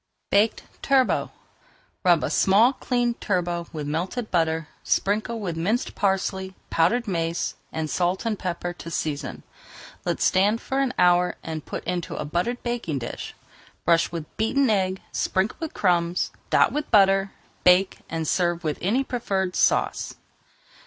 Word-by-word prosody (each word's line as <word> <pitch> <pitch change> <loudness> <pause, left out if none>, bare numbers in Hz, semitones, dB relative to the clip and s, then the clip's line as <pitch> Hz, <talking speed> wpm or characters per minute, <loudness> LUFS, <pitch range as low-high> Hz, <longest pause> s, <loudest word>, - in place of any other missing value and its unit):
BAKED 210 +3 +3 0.2
TURBOT 270 -2 +2 0.7
Rub 175 -4 +4
a - - -1
small 215 +7 +5
cleaned 245 -2 -1
turbot 175 -3 -1
with 150 -2 -5
melted 180 +10 -3
butter, 160 -2 +1 0.2
sprinkle 215 +3 0
with 180 -6 -3
minced 200 +9 -1
parsley, 190 -1 -1 0.2
powdered 205 +9 +2
mace, 165 -3 -1 0.2
and 160 0 -2
salt 180 +6 0
and 220 -3 -1
pepper 175 -1 -3
to 170 - -9
season. 155 -3 -3 0.6
Let - - -1
stand 205 +4 +3
for 265 +3 -2
an 270 -2 0
hour 180 0 +4
and 160 -2 -6
put - - -5
into 175 -2 -3
a - - -3
buttered 180 +11 -2
baking 235 - -2
dish. 120 -2 -6 0.5
Brush 170 0 +3
with 165 -3 -4
beaten 245 +3 +2
egg, 190 -2 0
sprinkle 190 +3 0
with 320 -2 -5
crumbs, 175 -2 +1 0.2
dot - - +4
with 295 0 -3
butter, 195 -1 +4 0.3
bake, 180 +2 +4
and 160 -1 -3
serve 175 0 +1
with 155 -2 -2
any 230 +9 +1
preferred 195 -8 -2
sauce. - - +1
185 Hz, 145 wpm, -25 LUFS, 170-220 Hz, 0.7 s, small